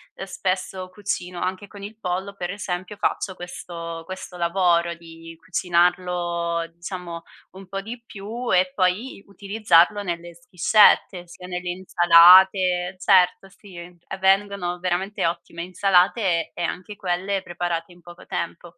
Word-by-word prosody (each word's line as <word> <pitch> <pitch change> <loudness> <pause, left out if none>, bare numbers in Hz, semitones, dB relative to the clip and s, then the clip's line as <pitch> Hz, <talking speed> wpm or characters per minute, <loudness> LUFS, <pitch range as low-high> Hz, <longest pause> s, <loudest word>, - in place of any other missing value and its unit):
uhm, 195 - -7
spesso 185 -1 -3
cucino 185 -2 -4
anche 185 +2 -3
con 200 0 -12
il 210 +2 -9
pollo, 190 +1 -3
per 175 -3 -4
esempio, 190 0 -5
faccio 195 -2 -2
questo 170 -2 -8
questo 185 0 -8
lavoro 170 -1 +1
di 165 0 -13
cucinarlo 175 -1 0
diciamo 170 -1 -7 0.3
un 190 +1 -13
po' 195 +1 -5
di 230 +4 -8
più 230 +4 -6
e 185 0 +3
poi 195 +5 -1
utilizzarlo 200 -1 +2
nelle 170 -2 -5
schiscette, 205 -5 +3
sia 180 +1 -12
nelle 180 0 -4
insalate 180 +1 +5
certo, 190 0 +3
sì, 195 0 -16
e 175 +2 -10
vengono 190 -2 +1
veramente 185 +3 -2
ottime 170 0 -5
insalate 185 -1 +2
e - - -7
anche 185 +4 -4
quelle 190 +1 -2
preparate 175 -1 -4
in 175 0 -18
poco 175 +1 -14
tempo. 170 0 -6
180 Hz, 135 wpm, -23 LUFS, 175-195 Hz, 0.3 s, insalate